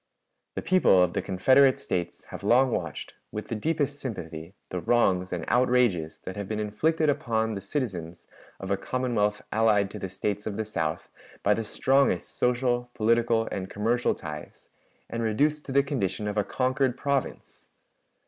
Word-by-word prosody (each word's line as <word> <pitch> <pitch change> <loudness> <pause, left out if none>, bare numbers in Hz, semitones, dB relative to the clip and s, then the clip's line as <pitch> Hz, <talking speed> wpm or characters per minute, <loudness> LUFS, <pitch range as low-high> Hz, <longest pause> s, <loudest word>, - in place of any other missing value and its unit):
"The - - -3
people 180 - +5
of 90 - 0
the - - 0
Confederate 130 +8 +4
States 85 -2 -3
have - - -8
long 130 +2 +4
watched, - - -4 0.2
with 105 - -6
the 115 - -2
deepest 145 +3 -1
sympathy, 85 - -6
the 90 - -3
wrongs 95 -6 +2
and - - -3
outrages 120 -10 +2
that 95 - -5
have 100 -2 -5
been 110 +1 -3
inflicted 155 +10 +1
upon 110 -5 0
the 100 - -5
citizens 95 - -4 0.3
of 95 0 -5
a 100 - +2
Commonwealth 110 -3 -1
allied 105 -3 +3
to 105 - -7
the 95 - -4
States 100 +3 -3
of 100 - -3
the 110 - -2
South 80 -7 -2 0.4
by 105 - +4
the 115 - -2
strongest 135 +5 +1
social, 125 0 +1
political, 115 0 +2
and 95 -1 -4
commercial 115 +4 +1
ties, 75 -1 -9 0.4
and 115 - -4
reduced 145 +7 +1
to - - -4
the 140 +1 +4
condition 105 -7 -2
of 105 - -2
a 105 - +2
conquered 130 +2 0
province. 140 0 -3
110 Hz, 165 wpm, -27 LUFS, 100-130 Hz, 0.4 s, people